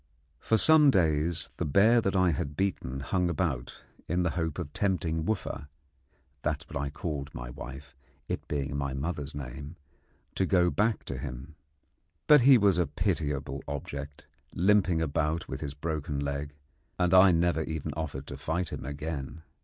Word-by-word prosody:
For 110 - +2
some 155 +4 +6
days 80 - +2
the - - -1
bear 110 +10 +5
that 100 -2 -1
I 95 -2 +4
had 70 -1 -3
beaten 70 -9 -2
hung 90 +5 0
about, 75 -7 -2 0.3
in 90 +2 +1
the 85 - +1
hope 80 -3 -2
of 80 -5 -5
tempting 90 -6 0
Wooffa 85 -9 -3 0.7
(that - - -2
was - - -13
what 70 - -1
I 70 - -2
called 75 -1 -4
my - - -6
wife, 65 +4 -9 0.3
it - - -4
being 70 -1 -2
my 70 -1 -2
mother's 75 0 -4
name) 70 +3 -7 0.6
to 95 - 0
go 90 -2 +3
back 110 +1 +1
to - - -5
him. 65 +5 -7 0.7
But 150 -2 +7
he 130 +1 +8
was 100 -5 +3
a 85 - +2
pitiable 70 -2 -2
object, 70 0 -6 0.3
limping 95 -3 +3
about 80 +2 -1
with - - -5
his 70 -1 -5
broken 75 -2 -3
leg, 70 +1 -3 0.4
and 90 0 +2
I 95 0 +8
never 85 -1 +2
even 80 -2 -4
offered 75 -4 -4
to - - -7
fight 85 +2 -2
him - - -6
again. 75 +2 -5
80 Hz, 170 wpm, -29 LUFS, 70-90 Hz, 0.7 s, he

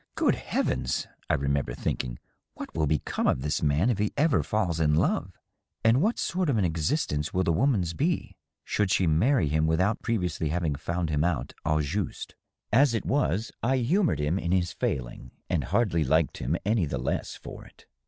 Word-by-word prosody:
^ - - -46
Good - - +3
heavens - - -1
!' - - -35
I - - +3
remem 70 0 0
ber - - -6
thinking, 60 -2 -2
^ - - -10 0.4
what - - -8
will 80 -2 0
become 75 0 0
of 65 - +1
this 75 +1 -1
man 75 +10 +2
if 105 - -2
he 105 0 +1
ever 150 0 +3
falls 95 -7 -1
in 75 -2 +3
love? - - 0 0.5
And 115 +2 +5
wliat 215 +9 +1
sort 180 -2 -1
of 130 - +2
an 100 - +2
existence 80 - -1
will 95 - +2
the 85 - +2
woman's 95 - +1
be, 80 - -1 0.3
should 105 -2 0
she 95 - +2
marry 85 - +3
him 80 +2 +1
without 95 +7 +1
previously 90 -8 -1
having 85 -1 0
found 85 +3 -2
him 75 0 +1
out 85 -3 -1
au 75 0 +2
juste 95 +7 -3
f - - -42 0.4
As 140 -4 +4
it 115 - -2
was, 120 - 0
I 130 +3 +2
humored 130 - +2
him 75 +6 0
in 85 -1 -2
his 90 -3 +1
failing, - - -4 0.2
and 80 -7 0
hardly 85 - +1
liked 80 +3 +1
him 70 +8 -1
any 105 -5 +2
the - - -3
less - - -2
for - - -10
it. - - -19
85 Hz, 205 wpm, -27 LUFS, 75-115 Hz, 0.5 s, And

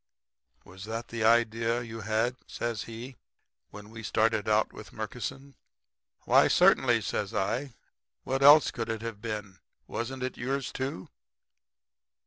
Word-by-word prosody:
"'Was 95 +2 -11
that 115 +2 -5
the 115 -1 -3
idea 115 +1 +2
you 115 -1 -8
had,' 110 +4 0
says 115 -3 -3
he, 115 +2 -9 0.5
'when 105 +1 -12
we 115 0 -9
started 110 0 +1
out 110 0 +2
with - - -11
Murkison?' 140 +1 -6 0.7
"'Why, - - +5
certainly,' - - +4
says - - -3
I. 120 +6 -1 0.5
'What 135 +1 -2
else 145 +1 +8
could 115 -1 -4
it 110 0 -3
have 115 -3 -6
been? 105 -4 -5 0.3
Wasn't 130 +2 -4
it 130 - -4
yours, 135 +2 -2
too?' 130 -9 -4
115 Hz, 135 wpm, -29 LUFS, 110-125 Hz, 0.7 s, else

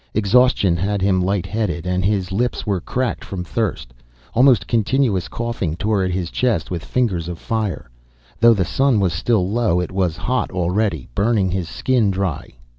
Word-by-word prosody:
Exhaustion 110 -3 +3
had 100 +2 -1
him 95 -2 +2
light 95 -1 0
headed, 95 -4 -2
and 90 0 0
his 95 -1 0
lips 120 +6 -1
were 100 -5 -1
cracked 125 +6 -2
from 95 -3 -5
thirst. 90 - -3 0.4
Almost 125 -2 +4
continuous 115 -4 +1
coughing 115 -9 -3
tore 105 +1 0
at 95 - 0
his 90 -2 -3
chest 115 -11 0
with 85 -2 -3
fingers 95 -10 -1
of 90 -1 -5
fire. 110 - -3 0.5
Though 115 0 +6
the 95 -3 0
sun 135 +2 +2
was 95 -4 +1
still 90 +3 +1
low 105 -4 +1
it 90 - -3
was 90 -4 -1
hot 125 +9 -1
already, 90 - -1
burning 100 -3 +1
his 90 -3 -2
skin 125 -6 +1
dry. 95 -5 -3
100 Hz, 175 wpm, -20 LUFS, 90-115 Hz, 0.5 s, Though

